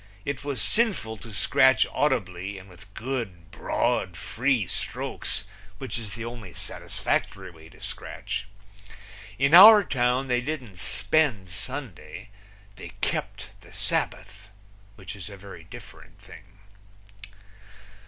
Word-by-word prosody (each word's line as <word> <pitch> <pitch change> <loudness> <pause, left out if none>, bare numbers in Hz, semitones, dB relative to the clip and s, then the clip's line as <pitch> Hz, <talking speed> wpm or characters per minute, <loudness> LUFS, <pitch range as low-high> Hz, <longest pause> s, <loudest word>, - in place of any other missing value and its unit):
It 145 -1 -3
was 140 -4 -2
sinful 110 - +2
to 115 +2 -10
scratch 130 +6 +4
audibly 95 -8 -1
and 95 0 -12
with 95 +2 -15
good, 115 -10 -5
broad, 90 -2 -1
free 115 +4 0
strokes, 95 - -3 0.3
which 130 0 -5
is 105 -3 -7
the 115 0 -6
only 115 -6 -8
satisfactory - - -3
way 80 -1 -15
to - - -18
scratch. 100 0 -6 0.9
In 140 +3 +2
our 205 +4 +11
town 125 -3 +1
they 125 -1 +1
didn't 125 - -5
spend 110 - +1
Sunday; 115 - -7 0.5
they - - -9
kept - - -3
the - - -17
Sabbath, 105 - -2 0.5
which 95 0 -9
is 95 -2 -9
a 100 - -10
very 95 -4 -11
different - - -13
thing. - - -14
110 Hz, 125 wpm, -26 LUFS, 95-135 Hz, 0.9 s, our